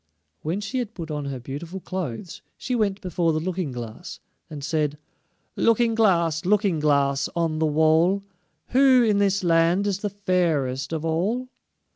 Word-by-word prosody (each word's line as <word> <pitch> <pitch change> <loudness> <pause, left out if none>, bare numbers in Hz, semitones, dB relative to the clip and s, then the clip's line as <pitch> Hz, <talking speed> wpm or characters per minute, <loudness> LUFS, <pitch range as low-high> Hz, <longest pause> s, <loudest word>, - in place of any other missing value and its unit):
When 170 +6 -2
she 255 +5 -3
had 230 -3 -4
put 165 -3 -6
on 150 -1 -3
her 135 -2 -4
beautiful 150 +9 -7
clothes, 180 - -5 0.2
she 255 - -4
went 205 -4 0
before 170 -3 0
the 155 - 0
Looking 175 -2 -3
glass, 120 -3 -8 0.3
and 145 -3 -7
said: 150 -2 -1 0.6
"Looking 230 0 +3
glass, 170 -7 +2
Looking 195 -3 +2
glass, 140 -2 +2
on 165 -2 0
the 160 - +2
wall, 160 +6 +3 0.5
Who 260 -1 +5
in 210 -3 +2
this 195 -1 +1
land 170 +3 +3
is 200 -2 -1
the 205 - -2
fairest 160 -10 0
of 160 -1 -3
all?" 205 +11 -1
170 Hz, 160 wpm, -24 LUFS, 155-200 Hz, 0.6 s, Who